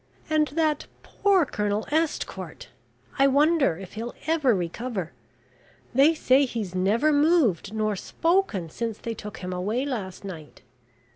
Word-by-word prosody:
And 305 -1 +3
that 305 0 0 0.2
poor 390 -5 +2
Colonel 210 -2 -1
Estcourt 320 0 -2 0.5
I 275 - +6
wonder 285 - +3
if 190 -1 -10
he'll 230 +2 -6
ever 300 -7 +3
recover 185 +1 -3 0.8
they 285 +6 +5
say 275 -2 +4
he's 220 -7 -4
never 215 +11 +2
moved 290 - +3
nor 215 -1 -1
spoken 330 - 0
since 230 +1 -3
they 230 - -5
took 210 -1 -8
him 180 0 -3
away 210 +9 -1
last 200 -9 -5
night. 160 -6 -9
235 Hz, 135 wpm, -25 LUFS, 195-300 Hz, 0.8 s, I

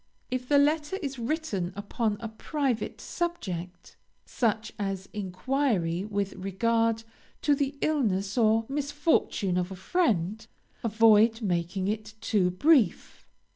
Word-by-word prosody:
If 250 0 -3
the 290 - +5
letter 295 +4 +2
is 275 -3 -4
upon 210 - -2
a 230 - -3
private 255 +2 -2
subject, 185 - -4 0.3
such 220 -2 -1
as 195 -2 -3
enquiry 200 -3 -1
with 200 -2 -2
regard 225 +4 0 0.4
to 295 - +4
the 280 0 -1
illness 205 -10 0
or 225 -1 +3
misfortune 285 - 0
of 180 0 0
a - - -5
friend, 215 - 0 0.4
avoid 225 0 +4
making 180 0 -1
it 215 +1 -3
too 205 -4 +2
brief. 270 - +2
220 Hz, 115 wpm, -28 LUFS, 195-275 Hz, 0.4 s, the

